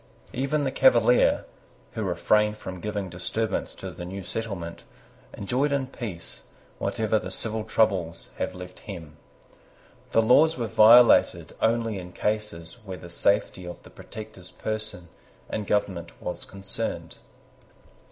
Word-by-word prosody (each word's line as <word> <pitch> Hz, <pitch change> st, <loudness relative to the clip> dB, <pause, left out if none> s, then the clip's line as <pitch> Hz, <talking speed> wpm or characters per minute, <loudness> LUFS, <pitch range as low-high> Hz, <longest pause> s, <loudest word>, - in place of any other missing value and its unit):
Even 140 Hz, +4 st, 0 dB
the 135 Hz, -, 0 dB
Cavalier, 125 Hz, -3 st, +4 dB, 0.5 s
who -, -, -4 dB
refrained 105 Hz, 0 st, +2 dB
from 95 Hz, -3 st, -7 dB
giving 105 Hz, 0 st, -3 dB
disturbance 95 Hz, +5 st, -2 dB
to -, -, -7 dB
the -, -, -8 dB
new 95 Hz, +2 st, -6 dB
settlement, 95 Hz, -5 st, -5 dB, 0.5 s
enjoyed 130 Hz, +8 st, 0 dB
in 140 Hz, -2 st, +1 dB
peace 110 Hz, -10 st, -7 dB, 0.4 s
whatever 110 Hz, -1 st, +1 dB
the -, -, -6 dB
civil 110 Hz, -1 st, -3 dB
troubles 95 Hz, -7 st, 0 dB
had -, -, -2 dB
left 90 Hz, 0 st, -9 dB
hem. 80 Hz, -7 st, -9 dB, 0.9 s
The 115 Hz, -, +4 dB
laws 155 Hz, +8 st, +5 dB
were 120 Hz, -, -1 dB
violated 115 Hz, +2 st, +6 dB
only 115 Hz, -2 st, +1 dB
in 90 Hz, 0 st, -9 dB
cases 105 Hz, -1 st, -2 dB
where 95 Hz, -3 st, -6 dB
the 85 Hz, -1 st, -10 dB
safety 100 Hz, +1 st, +1 dB
of 85 Hz, -, -8 dB
the -, -, -15 dB
Protector's 105 Hz, -4 st, -10 dB
person 110 Hz, -5 st, -4 dB, 0.4 s
and 105 Hz, -2 st, -4 dB
government 95 Hz, -4 st, -1 dB
was -, -, -5 dB
concerned. 95 Hz, 0 st, -4 dB
105 Hz, 130 wpm, -26 LUFS, 90-115 Hz, 0.9 s, violated